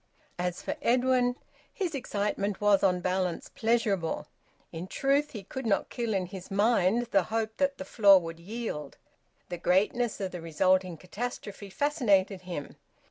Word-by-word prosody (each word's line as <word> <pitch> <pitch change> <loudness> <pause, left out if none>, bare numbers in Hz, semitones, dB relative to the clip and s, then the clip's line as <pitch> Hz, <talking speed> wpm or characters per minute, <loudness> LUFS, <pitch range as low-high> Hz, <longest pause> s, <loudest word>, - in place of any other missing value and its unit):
As 180 0 -2
for - - -2
Edwin, 250 0 +3 0.4
his 365 -5 -3
excitement 205 -5 -2
was, 205 -2 +4
on 180 -2 +2
balance, 185 -1 -1
pleasurable. 220 -7 0 0.5
In 170 +2 -6
truth, 280 +7 +1
he 210 -4 -6
could 255 +5 -5
not 200 - +1
kill 230 -3 -2
in 185 -1 0
his 185 0 -9
mind 210 +1 +3
the 195 -3 +3
hope 220 0 -2
that 280 -1 +1
the - - -6
floor 200 -3 +6
would 165 -1 -7
yield. 175 -7 -5 0.5
The 175 -1 -5
greatness 210 +7 +1
of 190 -2 -3
the 180 - -6
resulting 180 +2 +1
catastrophe 205 +1 -6
fascinated 205 - +1
him. 175 -6 -7
200 Hz, 150 wpm, -29 LUFS, 180-235 Hz, 0.5 s, floor